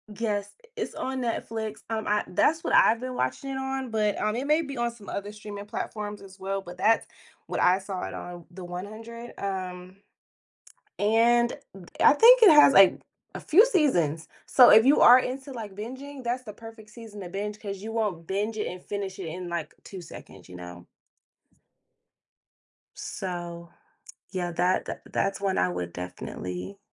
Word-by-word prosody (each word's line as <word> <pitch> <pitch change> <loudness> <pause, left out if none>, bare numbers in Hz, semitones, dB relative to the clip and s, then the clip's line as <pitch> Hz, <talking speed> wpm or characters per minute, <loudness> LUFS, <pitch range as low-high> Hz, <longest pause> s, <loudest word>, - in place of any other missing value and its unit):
Yes, 205 -2 -2 0.3
it's 445 - -4
on 265 0 -3
Netflix, 220 -2 -4
um, 220 -1 -3
I 210 0 +1
that's 320 - +2
what - - -2
I've 230 +1 +5
been 255 0 -5
watching 275 - -2
it 265 - -3
on, 265 -1 -3
but, 210 -2 0
um, 215 +2 0
it 265 +3 -3
may 305 +2 +3
be 280 -4 -7
on 240 0 0
some 230 -3 -12
other 205 +1 -5
streaming 205 -1 -8
platforms 210 0 -5
as 195 0 -14
well, 195 +1 -3
but 180 -1 -11
that's 225 +4 +3 0.4
what - - -3
I 185 +1 +4
saw 190 -1 -6
it - - -7
on 175 -1 -8
The 185 +1 -10
100, 215 +7 -8
um, 185 -1 -5 1.0
and 235 +3 +3 0.5
I - - +7
think 470 +9 +7
it 395 - +9
has, 295 -2 +8
like, 195 -5 +7 0.3
a - - -6
few 390 +9 +5
seasons, 175 - +1 0.2
so 250 -2 +7
if 220 +3 +7
you 285 - +5
are 245 +1 +9
into, 265 +2 -3
like, 220 -5 -7
binging, 260 +6 -8
that's 245 +1 -2
the 215 -4 -9
perfect 225 0 -13
season 220 -3 -11
to 180 - -7
binge, 205 +3 -5
'cause 200 -2 -6
you 220 - -6
won't 205 -8 -2
binge 210 +3 -2
it 210 - -2
and 180 0 -8
finish 195 -2 -5
it 190 - -6
in, 180 +2 -6
like, 170 -3 -4
2 190 -2 -9
seconds, 95 - -13
you 90 - -12
know? 90 0 -10 2.1
So, 175 -2 -6 0.6
yeah, 180 -2 -3
that 180 +2 +1
th - - -5
that's 195 0 -1
one 195 -1 0
I 90 - +2
would 90 -1 -5
definitely 90 - -7
210 Hz, 180 wpm, -26 LUFS, 185-235 Hz, 2.1 s, it